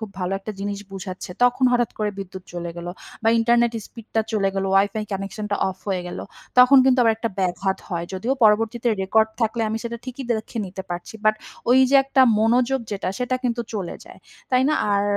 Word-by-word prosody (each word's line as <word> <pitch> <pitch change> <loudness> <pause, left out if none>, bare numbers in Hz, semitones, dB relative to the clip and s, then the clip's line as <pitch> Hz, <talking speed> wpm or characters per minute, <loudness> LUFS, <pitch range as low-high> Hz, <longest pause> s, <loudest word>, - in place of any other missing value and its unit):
খুব 220 -2 -6
ভালো 180 +1 -1
একটা 205 +2 -7
জিনিস 200 0 -3
বুঝাচ্ছে, 185 -2 -7
তখন 245 +1 +3
হঠাৎ 240 -2 +2
করে 210 -1 0
বিদ্যুৎ 190 -1 -7
চলে 175 0 -4
গেলো 170 0 -5 0.3
বা 225 - +3
ইন্টারনেট 235 +1 +3
স্পিডটা 225 -1 -3
চলে 200 -3 +2
গেলো, 195 0 -1
WiFi 205 +2 +2
কানেকশনটা 200 +2 -3
অফ 190 - -6
হয়ে 185 -2 -1
গেলো, - - -6 0.3
তখন 250 +2 +8
কিন্তু 260 -1 +4
আবার 225 -1 +4
একটা 225 0 -3
ব্যাঘাত 190 +1 0
হয়। 170 -1 -2
যদিও 205 +8 -1
পরবর্তীতে 225 +3 +3
রেকর্ড 220 +3 +3
থাকলে 225 0 0
আমি 220 - -2
সেটা 235 0 -4
ঠিকই 255 +1 -6
দেখে 220 +1 -2
নিতে 190 +1 -7
পারছি, 175 +4 -6
বাট 215 - +5 0.4
ওইযে 260 +2 +5
একটা 270 -1 +4 0.2
মনোযোগ 245 +4 +2
যেটা, 195 - -2
সেটা 250 +1 -1
কিন্তু 240 -1 0
চলে 190 -5 -3
যায়, - - -14 0.3
তাই 255 0 +4
না? 305 - +2 0.2
আর 200 - +2
220 Hz, 195 wpm, -23 LUFS, 195-240 Hz, 0.4 s, তখন